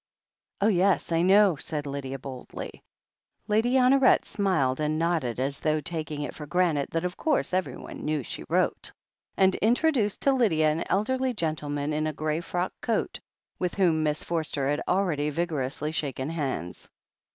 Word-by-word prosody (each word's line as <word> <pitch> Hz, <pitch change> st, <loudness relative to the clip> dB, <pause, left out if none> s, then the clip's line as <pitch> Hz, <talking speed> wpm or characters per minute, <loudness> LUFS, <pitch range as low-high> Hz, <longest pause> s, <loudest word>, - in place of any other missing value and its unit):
"Oh, 205 Hz, -, +4 dB
yes, 190 Hz, -3 st, +2 dB
I 165 Hz, 0 st, +3 dB
know," 190 Hz, -1 st, +5 dB
said 150 Hz, +1 st, -4 dB
Lydia 135 Hz, -1 st, -4 dB
boldly. 130 Hz, -1 st, -8 dB, 0.7 s
Lady 225 Hz, +4 st, +2 dB
Honoret 260 Hz, +1 st, +5 dB
smiled 155 Hz, -10 st, 0 dB
and 155 Hz, 0 st, 0 dB
nodded, 160 Hz, -8 st, 0 dB
as 140 Hz, +2 st, -2 dB
though 155 Hz, 0 st, +1 dB
taking 155 Hz, -2 st, -4 dB
it -, -, -5 dB
for 150 Hz, -, -8 dB
granted 170 Hz, -5 st, +1 dB
that 165 Hz, +1 st, -2 dB
of 180 Hz, +1 st, -3 dB
course 305 Hz, -, 0 dB
everyone 180 Hz, -8 st, -3 dB
knew 150 Hz, -2 st, -1 dB
she -, -, -6 dB
wrote, -, -, +1 dB, 0.5 s
and 190 Hz, -1 st, +5 dB
introduced 240 Hz, -2 st, +2 dB
to 275 Hz, -, +4 dB
Lydia 160 Hz, -12 st, +3 dB
an 160 Hz, +2 st, -1 dB
elderly 255 Hz, +5 st, +1 dB
gentleman 150 Hz, -4 st, -2 dB
in 155 Hz, +1 st, 0 dB
a 155 Hz, -, -2 dB
grey 155 Hz, +2 st, -1 dB
frock 175 Hz, +2 st, -2 dB
coat, 230 Hz, -, -1 dB, 0.4 s
with 180 Hz, -1 st, -1 dB
whom 170 Hz, -5 st, +3 dB
Miss 150 Hz, -1 st, -1 dB
Forster 155 Hz, -5 st, -1 dB
had 145 Hz, -, -1 dB
already 170 Hz, -6 st, +1 dB
vigor 160 Hz, -1 st, -1 dB
ously 140 Hz, +4 st, -3 dB
shaken 140 Hz, -2 st, -2 dB
hands. 135 Hz, -, -4 dB
160 Hz, 165 wpm, -27 LUFS, 145-195 Hz, 0.7 s, know